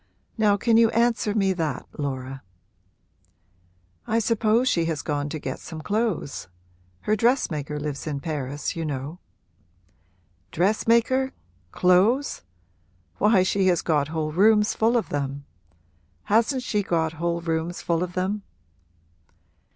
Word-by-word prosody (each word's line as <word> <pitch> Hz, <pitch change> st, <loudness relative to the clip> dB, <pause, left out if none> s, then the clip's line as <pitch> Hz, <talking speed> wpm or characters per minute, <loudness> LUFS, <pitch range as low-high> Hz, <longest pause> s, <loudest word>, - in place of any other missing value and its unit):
Now 210 Hz, -3 st, +3 dB
can 225 Hz, +2 st, +3 dB
you 230 Hz, -1 st, +6 dB
answer 230 Hz, -2 st, +1 dB
me 195 Hz, -3 st, +2 dB
that, 165 Hz, -4 st, -3 dB
Laura?' 135 Hz, -2 st, -4 dB, 1.7 s
'I 225 Hz, -, +1 dB
suppose 230 Hz, +2 st, +2 dB
she 170 Hz, -9 st, +2 dB
has 160 Hz, -3 st, -2 dB
gone 145 Hz, -1 st, -2 dB
to 155 Hz, -, -4 dB
get 135 Hz, -3 st, -5 dB
some 160 Hz, -2 st, -8 dB
clothes: 205 Hz, -, -2 dB, 0.5 s
her 215 Hz, -, +1 dB
dressmaker 155 Hz, -, 0 dB
lives 145 Hz, 0 st, -5 dB
in 145 Hz, -2 st, -2 dB
Paris, 145 Hz, -2 st, -4 dB
you 165 Hz, -, -3 dB
know.' 145 Hz, +3 st, -4 dB, 1.3 s
'Dressmaker? 230 Hz, +8 st, +2 dB, 0.4 s
Clothes? 200 Hz, +10 st, +3 dB, 0.8 s
Why, 210 Hz, -3 st, +4 dB
she 190 Hz, 0 st, +1 dB
has 175 Hz, -2 st, +2 dB
got 150 Hz, -4 st, +1 dB
whole 155 Hz, -1 st, -2 dB
rooms 210 Hz, +5 st, +4 dB
full 230 Hz, +2 st, +2 dB
of 230 Hz, -, -2 dB
them. 140 Hz, 0 st, -3 dB, 0.8 s
Hasn't 235 Hz, +4 st, +2 dB
she 210 Hz, -4 st, 0 dB
got 165 Hz, -4 st, 0 dB
whole 170 Hz, 0 st, 0 dB
rooms 165 Hz, +1 st, -2 dB
full 170 Hz, -1 st, 0 dB
of 180 Hz, 0 st, -3 dB
them?' 190 Hz, +3 st, -1 dB
180 Hz, 130 wpm, -24 LUFS, 155-220 Hz, 1.7 s, you